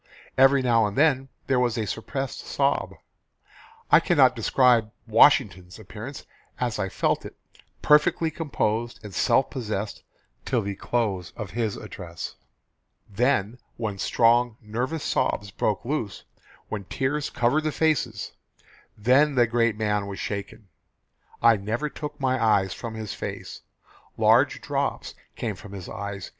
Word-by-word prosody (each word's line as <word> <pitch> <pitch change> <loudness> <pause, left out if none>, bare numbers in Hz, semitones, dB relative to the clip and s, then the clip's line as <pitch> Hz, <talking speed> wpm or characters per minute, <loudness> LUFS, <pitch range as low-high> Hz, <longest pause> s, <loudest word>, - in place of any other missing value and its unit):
Every 135 +1 +5
now 115 -3 +3
and 100 - -6
then 135 -3 +3 0.2
there 130 -2 +2
was 120 -2 +1
a 110 - -1
suppressed 125 +7 -4
sob. - - -1 1.0
I - - +9
cannot - - +4
describe 120 -4 +3 0.2
Washington's 105 -6 +4
appearance 110 +6 -9 0.3
as 120 -4 -1
I 95 -2 -1
felt 90 - 0
it - - -9 0.5
perfectly 150 +2 +4
composed 120 -7 -2
and 105 -2 -9
self 130 - +2
possessed 110 -5 -4 0.4
till 120 -4 0
the 100 0 -3
close 100 -4 -2
of 105 -4 -6
his 110 -2 -2
address. 85 -3 -8 0.7
Then 120 +1 0 0.2
when 105 -4 -4
strong, 120 +3 +3
nervous 125 +8 -3
sobs 105 -1 -1
broke 105 +1 -1
loose, 120 -7 -3 0.4
when 105 -3 -5
tears 140 +7 -2
covered 130 +6 +1
the 155 - 0
faces, 155 -5 0 0.7
then 135 +7 +4
the 120 -1 +5
great 115 -2 +1
man 105 -2 0
was 100 -1 -6
shaken. 100 0 -5 0.8
I 115 -2 +6
never 110 +9 -2
took 150 -1 -7
my 130 -3 +1
eyes 100 -4 +3
from 115 -1 -7
his 110 -2 -5
face. - - -6 0.6
Large - - +4
drops - - -2 0.2
came 110 -4 -3
from 100 +1 -12
his 95 -3 -7
eyes. 100 -1 -6
115 Hz, 140 wpm, -25 LUFS, 105-130 Hz, 1.0 s, I